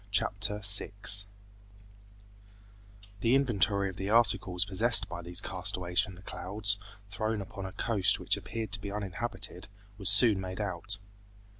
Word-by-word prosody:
Chapter 105 0 -3
6 100 0 +1 1.9
The 115 +4 +1
inventory 100 -7 0
of 95 -1 -9
the 95 0 -5
articles 105 -5 +2
possessed 105 +1 +3
by 85 -2 -8
these 85 +2 +1
castaways 90 -1 -1
from 95 - -6
the 90 - -16
clouds, 100 +3 +2 0.3
thrown 110 +2 -3
upon 95 0 -8
a - - -9
coast 105 -3 0
which - - 0
appeared 110 -3 -7
to 100 -1 -5
be 100 - -7
uninhabited, 105 -1 -6 0.3
was 100 - +4
soon 105 0 +9
made 95 +1 -8
out. 100 0 -5
100 Hz, 140 wpm, -28 LUFS, 95-105 Hz, 1.9 s, soon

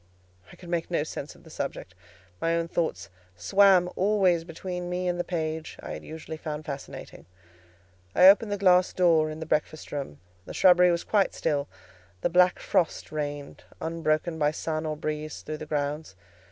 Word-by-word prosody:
I - - -13
could 175 - -13
make 170 -1 -1
no 170 -4 0
sense 150 -1 -7
of - - -19
the 160 - -15
subject; 135 - -5 0.5
my 165 0 +1
own 170 0 -1
thoughts 90 - -2 0.2
swam 185 - +4
always 190 -4 +2
between 175 +1 -6
me 180 0 -2
and 175 0 -1
the - - +1
page 160 -2 -4
I - - -8
had - - -7
usually 160 0 -8
found 155 -1 -6
fascinating. 140 -1 -8 0.9
I 180 - +8
opened 205 +2 +6
the 205 - 0
glass 185 -2 +4
door 165 -4 +3
in 155 0 -7
the 160 - -5
breakfast 155 0 -2
room: 140 - -5 0.3
the - - -7
shrubbery 180 -1 +6
was 170 -1 0
quite 200 -3 +1
still: 145 -3 -1 0.5
the - - +1
black 180 +1 +5
frost 170 - -1
reigned, 145 -2 -5 0.2
unbroken 160 0 -1
by 150 -1 +3
sun 155 0 -3
or 155 -1 -3
breeze, 155 0 -4
through 155 0 -5
the 155 - -8
grounds. 145 -6 -3
160 Hz, 180 wpm, -27 LUFS, 155-180 Hz, 0.9 s, I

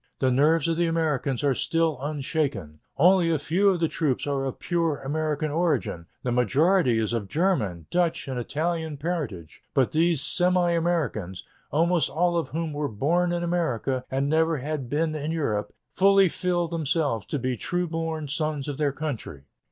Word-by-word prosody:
The 130 -1 +2
nerves 150 +4 +3
of 165 -1 0
the 170 0 +2
Americans 150 -6 0
are 140 -2 +3
still 165 +1 0
unshaken.... 140 - -2 0.2
Only 180 +2 +5
a 160 - +2
few 175 +8 +2
of 185 -3 +1
the 165 - +2
troops 150 -5 -1
are 140 -2 -1
of 135 - -4
pure 165 -4 0
American 155 +1 -2
origin; 145 - -1 0.2
the 125 - -1
majority 130 - +3
is 110 +1 0
of 110 -4 -2
German, 110 - 0
Dutch, 175 -4 0
and 130 -2 -3
Italian 160 +3 -2
parentage, 140 - -4
but 130 -3 +3
these 165 0 +2
semi 180 +1 +2
Americans, 150 - -1 0.3
almost 170 +3 +2
all 175 +3 +1
of 170 - -1
whom 160 0 -3
were 145 0 -1
born 170 +11 +1
in 175 0 -1
America 135 -7 -1
and 135 +1 0
never 160 +1 +2
have 140 -2 -4
been 155 +3 0
in 155 0 -3
Europe, 110 -11 -1 0.2
fully 195 0 +5
feel 175 0 -1
themselves 150 - -1
to - - -2
be 130 -1 -1
true 175 +10 -2
born 160 -2 -3
sons 150 -1 -2
of 145 -1 -4
their 145 -2 +2
country." 130 - -5
155 Hz, 175 wpm, -26 LUFS, 135-170 Hz, 0.3 s, Only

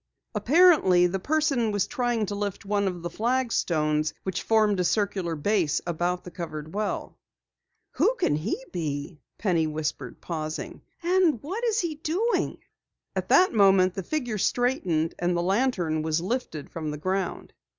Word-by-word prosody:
Apparently 235 - +5
the 185 +2 0
person 275 -2 +1
was 205 -2 +1
trying 240 -3 -1
to 205 - -4
lift 200 -1 -4
one 200 0 +1
of 175 -2 -4
the 175 - -3
flagstones 170 -10 0
which 190 -1 -2
formed 215 -3 +2
a - - +2
circular 185 -2 0
base 165 -1 +1
about 175 +1 -1
the 180 - -9
covered 160 -2 -6
well. 210 +1 -3 0.7
"Who - - +2
can 355 - +1
he 160 +12 -2
be?" 150 -2 -4 0.2
Penny 170 -6 +1
whispered, 150 -5 -4
pausing. 155 -2 -5 0.2
"And 350 -6 +3
what 390 +11 -4
is 450 -1 +2
he 340 -3 -2
doing?" 345 +10 -1 0.6
At - - -3
that 370 - +5
moment 195 -3 +5
the 195 - -4
figure 245 - -3
straightened, 180 - +1
and 175 0 +1
the 170 - 0
lantern 185 -6 +1
was 160 0 0
lifted 180 - -4
from 160 -2 -4
the 150 - -4
ground. 185 +3 -3
190 Hz, 155 wpm, -26 LUFS, 165-245 Hz, 0.7 s, Apparently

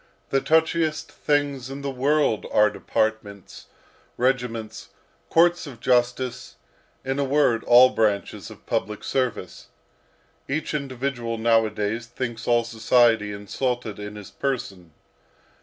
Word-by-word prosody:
The 135 - +2
touchiest 160 -1 +1
things 145 -3 -1
in 140 +1 -7
the 140 - -2
world 135 -2 +1
are 105 0 +4
departments, 105 -1 -3 0.5
regiments, 120 -3 -2 0.4
courts 175 0 +3
of 125 -5 -10
justice, 125 +1 0 0.5
in 135 +1 -2
a - - +2
word, 135 -5 +2
all 125 +1 +7
branches 105 -5 -1
of - - -14
public 105 0 -2
service. 125 -8 -3 0.8
Each 150 +3 -2
individual 130 -4 -3
nowadays 110 0 +1
thinks 120 -1 -5
all 120 -1 +3
society 115 -1 +2
insulted 110 +2 -3
in 105 0 -7
his 105 -2 -10
person. 100 - -4
120 Hz, 115 wpm, -24 LUFS, 110-135 Hz, 0.8 s, all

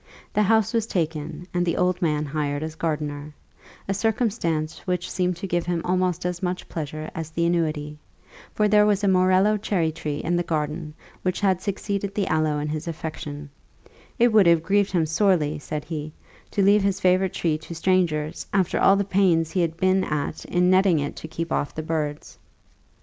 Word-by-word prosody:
The 210 - +2
house 220 +2 +3
was 225 -1 +1
taken, 160 -2 -3
and 175 0 +1
the 170 -1 0
old 180 0 +1
man 150 -3 +1
hired 145 0 -2
as 160 0 -4
gardener 150 -2 -3 0.5
a 195 - 0
circumstance 195 -7 -1
which 180 0 -1
seemed 180 -1 0
to 170 - -6
give 175 -2 -1
him 175 -1 0
almost 180 -1 0
as 180 -1 -2
much 180 -1 -3
pleasure 155 -1 -5
as 160 -1 -5
the 170 +1 -1
annuity; 155 -3 -1 0.5
for 210 - +2
there 210 0 +5
was 205 -1 +1
a - - +3
morello 185 +3 +4
cherry 180 -6 0
tree 155 -2 -4
in 175 - -1
the - - +1
garden 155 -2 -3 0.3
which 185 -1 -1
had 190 -3 +2
succeeded 200 0 -3
the 205 - +1
aloe 155 -1 +1
in 145 0 -2
his 155 +2 -4
affection: 150 -3 -6 0.7
"it 240 -2 +4
would 210 -5 +6
have 170 -1 +4
grieved 200 +3 +2
him 170 -4 +2
sorely," 160 -2 +2
he 150 - -6
said, 150 0 -5 0.6
"to 200 - 0
leave 205 +2 +5
his 195 -1 0
favourite 185 0 +2
tree 155 -3 0
to 170 +2 -9
strangers, 165 -3 0
after 190 -3 +1
all 195 - +6
the 200 - +1
pains 180 -5 +2
he 180 - +1
had 165 -1 -1
been 185 +1 +2
at 150 -2 -3
in 180 0 +2
netting 185 -2 +4
it 145 -1 -2
to - - -7
keep 165 +1 -5
off 145 - -1
the 155 - -4
birds." 155 -2 -4
175 Hz, 195 wpm, -24 LUFS, 155-190 Hz, 0.7 s, would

